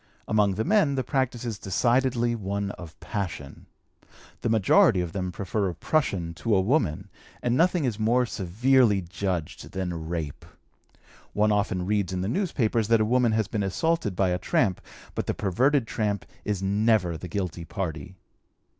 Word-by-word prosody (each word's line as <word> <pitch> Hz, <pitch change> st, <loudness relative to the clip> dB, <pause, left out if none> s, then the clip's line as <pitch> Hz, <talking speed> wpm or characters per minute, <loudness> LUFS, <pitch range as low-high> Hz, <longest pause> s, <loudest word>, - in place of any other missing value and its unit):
Among 105 Hz, -3 st, +2 dB
the 110 Hz, -, 0 dB
men 180 Hz, -, +3 dB
the 130 Hz, -, 0 dB
practice 130 Hz, -3 st, -1 dB
is 110 Hz, -4 st, -4 dB
decidedly 120 Hz, +4 st, +1 dB
one 100 Hz, -2 st, -3 dB
of 85 Hz, -5 st, -11 dB
passion. 90 Hz, -9 st, -5 dB, 0.7 s
The 120 Hz, -, -1 dB
majority 105 Hz, -3 st, +4 dB
of 90 Hz, -2 st, -2 dB
them 90 Hz, 0 st, -3 dB
prefer 100 Hz, +2 st, -2 dB
a 85 Hz, -, -6 dB
prushun 90 Hz, -, 0 dB
to 115 Hz, +1 st, +1 dB
a -, -, +4 dB
woman, 95 Hz, -, 0 dB, 0.3 s
and 120 Hz, 0 st, +1 dB
nothing 170 Hz, 0 st, +3 dB
is 115 Hz, -4 st, -2 dB
more 120 Hz, +3 st, +3 dB
severely 115 Hz, +2 st, +2 dB
judged 90 Hz, -1 st, -4 dB
than 90 Hz, -4 st, -3 dB
rape. 80 Hz, -5 st, -4 dB, 0.9 s
One 105 Hz, +1 st, +2 dB
often 100 Hz, -3 st, 0 dB
reads 100 Hz, -2 st, 0 dB
in 90 Hz, -, -2 dB
the 95 Hz, -, -2 dB
newspapers 120 Hz, -, 0 dB
that 115 Hz, 0 st, +4 dB
a -, -, +3 dB
woman 120 Hz, 0 st, +2 dB
has 110 Hz, -2 st, +1 dB
been 105 Hz, 0 st, -2 dB
assaulted 105 Hz, -, 0 dB
by 95 Hz, 0 st, +2 dB
a 90 Hz, 0 st, 0 dB
tramp, 95 Hz, -3 st, +1 dB, 0.3 s
but -, -, -3 dB
the -, -, -1 dB
perverted 125 Hz, +7 st, +2 dB
tramp 105 Hz, -2 st, -2 dB, 0.2 s
is 100 Hz, -2 st, -2 dB
never 100 Hz, -3 st, +2 dB
the 80 Hz, +3 st, -7 dB
guilty 90 Hz, -4 st, -3 dB
party. 85 Hz, -2 st, -5 dB
105 Hz, 165 wpm, -26 LUFS, 90-120 Hz, 0.9 s, majority